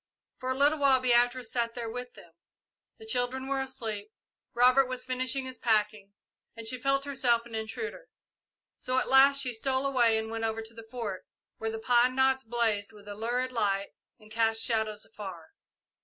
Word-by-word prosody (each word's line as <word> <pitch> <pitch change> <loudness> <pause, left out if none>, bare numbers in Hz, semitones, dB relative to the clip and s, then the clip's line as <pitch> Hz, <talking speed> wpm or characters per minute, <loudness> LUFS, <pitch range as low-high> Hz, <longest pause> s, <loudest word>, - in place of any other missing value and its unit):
For 255 - -4
a 260 - -1
little 290 +2 +3
while 275 -2 +5
Beatrice 245 -1 +2
sat 235 -1 -1
there 235 -2 -4
with 245 +2 -7
them. 170 - -15 0.7
The 445 - -12
children 260 - -1
were 275 0 0
asleep, 220 -6 -5 0.4
Robert 255 +2 +5
was 255 -1 -5
finishing 255 +1 -2
his 260 -2 -8
packing, 210 -3 0 0.4
and 230 -1 -9
she 250 +1 -1
felt 275 0 +1
herself 250 -4 +1
an 235 - -13
intruder, 430 - -5 0.7
so 255 0 -1
at - - +1
last 275 +1 +6
she 250 -2 -1
stole 260 +4 0
away 240 -5 +3
and 220 0 -3
went 225 0 -4
over 225 0 -2
to 220 +1 -11
the 225 -1 -12
Fort, 225 -6 -5 0.3
where 225 - -2
the 225 - -4
pine 245 +2 +3
knots 265 0 +3
blazed 225 -3 0
with 205 -2 -16
a 205 - -6
lurid 240 +4 -2
light 200 -4 0 0.3
and 215 0 -18
cast 225 0 +1
shadows 220 -2 -1
afar. 190 -7 -9
240 Hz, 185 wpm, -29 LUFS, 220-260 Hz, 0.7 s, last